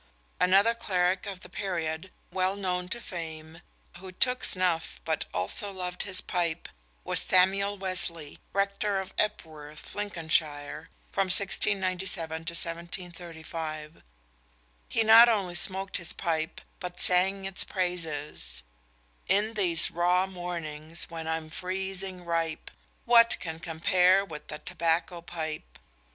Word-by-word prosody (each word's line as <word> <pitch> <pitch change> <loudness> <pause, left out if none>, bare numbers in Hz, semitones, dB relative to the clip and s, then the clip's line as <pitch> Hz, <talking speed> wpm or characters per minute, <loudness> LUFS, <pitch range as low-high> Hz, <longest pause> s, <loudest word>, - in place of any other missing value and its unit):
Another 195 +5 +5
cleric 185 -4 0
of 190 -2 -6
the - - -11
period, 175 -3 -3 0.2
well 185 +1 +1
known 180 -2 -2
to 235 - -3
fame, 165 -4 -7 0.4
who 190 0 -9
took 250 +7 +1
snuff 180 -3 +1
but 160 -2 -1
also 100 - +2
loved 180 -2 -4
his 190 -2 +1
pipe, 170 -3 -2 0.4
was - - +2
Samuel 195 +2 +3
Wesley, 180 -5 -1
rector 200 +1 0
of 190 - -7
Epworth, 155 -7 -3
Lincolnshire, 160 -7 -1 0.2
from 195 - +1
1697 185 -3 +1
to 170 - -4
1735. 165 -2 -6 0.9
He 225 - +2
not 225 +2 +9
only 195 -6 0
smoked 190 +2 +4
his 170 - -1
pipe, 160 -2 -2 0.2
but 180 -1 -6
sang 190 +2 +4
its 195 -1 +1
praises: 160 - -3 0.7
_In 210 +3 +2
these 180 -6 +4
raw 180 +2 +2
mornings, 170 -3 -3
when 165 -1 -6
I'm 160 -1 -3
freezing 185 0 -4
ripe, 165 -2 -2 0.3
What 235 -1 +6
can 160 -1 -6
compare 180 +4 +3
with 150 -5 -9
a 150 - -4
tobacco 170 +1 -1
pipe? 160 -2 -6
180 Hz, 120 wpm, -28 LUFS, 160-190 Hz, 0.9 s, not